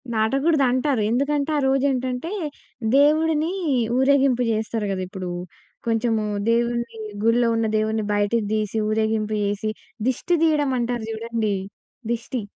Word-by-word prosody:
దాటగూడదంటారు. 265 +2 +2
ఎందుకంటే, 280 +4 +1
ఆ - - +2
రోజేంటంటే, 265 +2 0 0.7
దేవుడిని 310 +2 +3 0.5
ఊరేగింపు 265 -2 +3
జేస్తరు 220 0 -1
గద 190 -1 -2
ఇప్పుడూ, 185 -1 -6 0.6
కొంచము 225 -1 +1 0.3
దేవున్ని, 235 0 0 0.3
గుడిలో 235 +1 +3
ఉన్న 225 0 +1
దేవున్ని 215 0 0
బయటికి 205 +2 +1
తీసి, 215 0 -1
ఊరేగింపు 220 0 0
చేసి, 205 +1 -1 0.4
దిష్టి 305 +7 +1
తియ్యడమంటారు 255 -7 +1
జూడండి, 225 -2 -2 0.6
దిష్టి. 235 +1 -3
235 Hz, 105 wpm, -23 LUFS, 220-275 Hz, 0.7 s, దేవుడిని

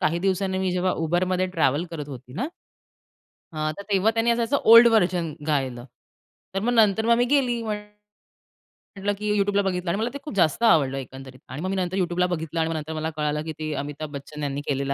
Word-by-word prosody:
काही 170 +2 +1
दिवसांनी 190 +1 0
मी 190 -1 0
जेव्हा 180 0 +1
Uberमध्ये 180 +3 +1
ट्रॅव्हल 150 0 +2
करत 150 -3 -6
होती 130 -2 -10
ना 245 - -2 1.1
हां, 155 0 -1
तर - - -5
तेव्हा 200 +2 +3
त्यांनी 225 +1 +1
असं 235 +3 +1
ओल्ड 230 +1 +9
व्हर्जन 180 -7 +1
गायलं. 130 -5 -1 0.7
तर 195 - 0
मग 235 +4 0
नंतर 220 -1 +4
मग - - +2
आम्ही 240 +1 +3
गेली 245 -5 +2
म्हण 215 -2 -2 1.2
म्हटलं 200 +1 -1
की 210 0 -3
YouTubeला 200 0 +2
बघितलं 180 -2 -2
आणि 170 - 0
मला 230 - 0
ते - - -4
खूप 300 - -7
जास्त 175 +4 +2
आवडलं 145 - +4
एकंदरीत 130 0 -9
आणि 130 +4 -6
मग 185 - -2
मी 195 - -1
नंतर 185 0 -2
YouTubeला 180 -1 +1
बघितलं 165 -2 -3
आणि 160 0 +1
मग 165 - -2
नंतर 155 0 -4
मला 155 0 -2
कळालं 150 0 -1
की 160 - -5
ते 155 -1 -3
अमिताभ 145 +1 -6
बच्चन 145 +1 -7
यांनी 140 0 -2
केलेलं 140 0 -1
175 Hz, 210 wpm, -24 LUFS, 150-200 Hz, 1.2 s, ओल्ड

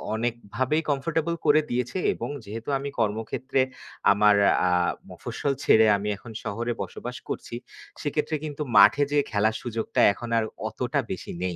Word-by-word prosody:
অনেকভাবেই 120 +5 -1
কমফোর্টেবল 160 +4 0
করে 155 +1 +5
দিয়েছে 125 +6 -2 0.2
এবং - - -5 0.2
যেহেতু 110 +4 -7
আমি 140 - -4
কর্মক্ষেত্রে 115 +5 0 0.5
আমার 105 +1 +5 0.3
আ - - +3 0.4
মফস্বল 140 - -3
ছেড়ে 110 0 +6
আমি 100 +1 -4
এখন 115 +3 -12
শহরে 115 +3 -2
বসবাস 125 +1 -6
করছি 115 - -5 0.5
সেক্ষেত্রে 150 +2 -1
কিন্তু 150 0 -6 0.2
মাঠে 145 - +7
যে 145 - +2
খেলার 110 +1 +2
সুযোগটা 115 -2 -3
এখন 120 +3 -8
আর 115 - +2 0.3
অতটা - - -2
বেশি - - -5
নেই, 90 -2 -2
120 Hz, 145 wpm, -26 LUFS, 110-145 Hz, 0.5 s, মাঠে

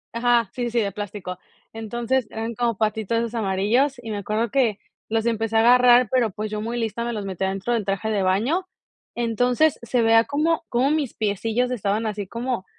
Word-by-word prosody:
Ajá, 235 -1 +3
sí, 240 -1 -2
sí, 235 - 0
de 200 -3 0
plástico. 195 -3 -6 0.3
Entonces, 235 +2 -2
eran 225 +1 -4
como 235 -3 -1
patitos 220 0 0
esos 230 0 -2
amarillos 225 +6 +1
y 225 - -5
me 210 - -3
acuerdo 215 +3 -2
que 235 -7 +2 0.3
los 225 0 0
empecé 225 -1 -1
a - - +5
agarrar, 245 +1 +6
pero, 250 -3 +2
pues, 210 +2 -5
yo 210 - -3
muy 235 +2 -3
lista 230 0 -2
me 240 - -3
los 210 -3 -4
metí 190 -1 -4
adentro 195 +5 -1
del 230 - 0
traje 195 +2 -2
de 205 -2 +1
baño. 240 - +1 0.5
Entonces, 245 +6 +1
se 235 0 0
veía 225 0 +5
como 310 +3 0
como 255 +4 +2
mis 300 -5 -1
piecillos 225 +4 -1
estaban 215 -1 -1
así 210 -2 -3
como 235 -3 -3
225 Hz, 195 wpm, -23 LUFS, 210-245 Hz, 0.5 s, agarrar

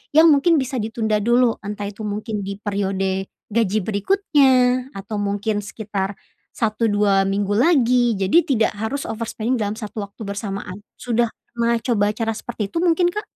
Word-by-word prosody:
yang 320 0 +8
mungkin 295 +4 +4
bisa 260 0 -3
ditunda 220 -1 -1
dulu. 240 +2 +3
Entah 205 0 -4
itu 205 - -14
mungkin 210 0 -3
di 200 - -4
periode 195 -2 -1 0.2
gaji 215 -1 +1
berikutnya 255 - +2
atau 205 +2 -5
mungkin 205 +1 -1
sekitar 205 -2 -4 0.4
1, 225 +1 0
2, 205 -2 +3
minggu 200 +1 -1
lagi. 250 -4 +4
Jadi, 205 - +3
tidak 225 -1 +2
harus 220 +7 -3
overspending 230 +2 -2
dalam 210 -1 -1
satu 215 -1 -7
waktu 200 +3 -18
bersamaan. 200 -2 -5 0.2
Sudah 240 -1 0 0.2
pernah 235 0 +1
coba 225 -5 +2
cara 225 0 -1
seperti 215 -4 -5
itu - - -4
mungkin, 350 0 +3
Kak? 420 +3 -4
220 Hz, 155 wpm, -21 LUFS, 205-250 Hz, 0.4 s, yang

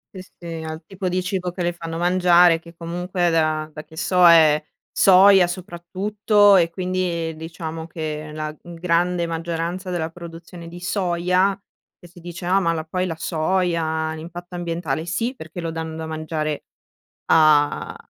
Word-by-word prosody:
Sì, 185 - -7 0.2
sì, 165 -2 -6
al 160 +1 -6
tipo 190 0 -4
di 185 +1 0
cibo 185 -1 -3
che 180 - -6
le 175 0 0
fanno 165 -1 -6
mangiare, 175 -1 +4
che 170 0 -15
comunque 175 +1 -2
da 155 -1 0
da 150 - -8
che 160 +1 -17
so 180 +1 +3
è 155 -3 +6 0.3
soia 190 0 +6
soprattutto, 195 +4 +1
e 170 -3 +4
quindi 175 -2 -2
diciamo 160 0 -7
che 155 -2 -5
la 155 0 -5
grande 175 0 0
maggioranza 170 +2 -4
della 170 -3 -2
produzione 170 0 -10
di 175 - -10
soia, 180 +1 0 0.4
che 175 - -15
si 175 0 -16
dice: 175 +1 -8
"Ah, 190 +2 +3
ma 170 -2 +1
la 160 -1 -3
poi 185 +3 -2
la 165 -2 -5
soia, 160 -2 -1
l'impatto 175 +3 -9
ambientale", 165 -3 -3
sì, 230 +10 -2
perché 160 -1 -9
lo 165 -1 -3
danno 160 0 -5
da 160 - -5
mangiare 155 -1 -3 0.7
a 150 -2 +3
170 Hz, 160 wpm, -22 LUFS, 160-180 Hz, 0.7 s, è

